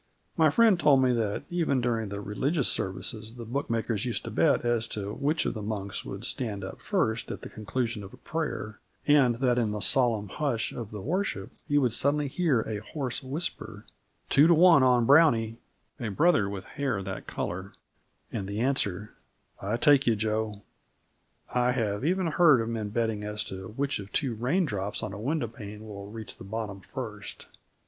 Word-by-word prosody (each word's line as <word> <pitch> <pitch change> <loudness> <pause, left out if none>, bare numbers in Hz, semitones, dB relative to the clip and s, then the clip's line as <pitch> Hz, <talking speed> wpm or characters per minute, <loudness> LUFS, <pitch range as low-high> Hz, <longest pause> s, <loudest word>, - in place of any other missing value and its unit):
My 160 -1 +5
friend 215 +2 +5
told 140 -5 +5
me 125 -1 +3
that 110 -1 -1
even 165 -6 +1
during 115 -3 -1
the 100 0 -5
religious 135 - 0
services 110 +4 -2
the 120 -1 -7
bookmakers 115 -4 -1
used 120 -2 -2
to - - -6
bet - - +2
as 120 -1 +2
to 105 -2 -4
which 150 +4 0
of - - 0
the 110 - -5
monks 100 -2 -4
would 100 +4 -5
stand 105 -7 -2
up 95 - -7
first 135 - 0
at - - -5
the - - -7
conclusion 115 +1 -3
of 100 - -10
a - - -14
prayer, 155 -9 -4 0.3
and 140 -5 +5
that 125 0 +2
in 115 -3 +1
the 105 - -3
solemn 115 -4 +2
hush 125 -2 -1
of 115 -4 -6
the 105 -2 -7
worship 185 +6 -2 0.2
he 145 -2 +2
would 125 -5 +2
suddenly 145 +3 +1
hear 140 -4 +1
a 110 -2 -4
hoarse 130 +4 -4
whisper: 145 +6 -5 0.4
"Two 145 +3 +6
to 170 - +6
one 170 -3 +7
on 125 -2 +4
Brownie" 115 -6 +5 0.4
a 120 -4 -3
brother 115 - +3
with 100 -2 -5
hair 135 -2 -2
of 95 - -5
that 95 0 -6
colour 95 +2 -4 0.6
and 95 - -3
the 100 +1 -3
answer: 105 -6 0 0.5
"I 105 +4 -1
take 140 +1 +5
you, 115 - +4
Joe." 110 -1 -2 0.9
I 125 0 +2
have 105 -3 -1
even 185 +4 +1
heard 160 -4 +5
of 115 0 -2
men 110 -3 -3
betting 110 -1 -1
as 105 0 -2
to 95 0 -7
which 140 -3 0
of 100 0 -9
two 135 -6 0
raindrops 120 - -1
on 95 - -4
a 100 - -7
window 140 +1 -1
pane 105 -1 -9
will 100 -1 -8
reach 110 0 -8
the - - -10
bottom 100 0 -5
first. 110 -3 -7
115 Hz, 190 wpm, -28 LUFS, 105-140 Hz, 0.9 s, one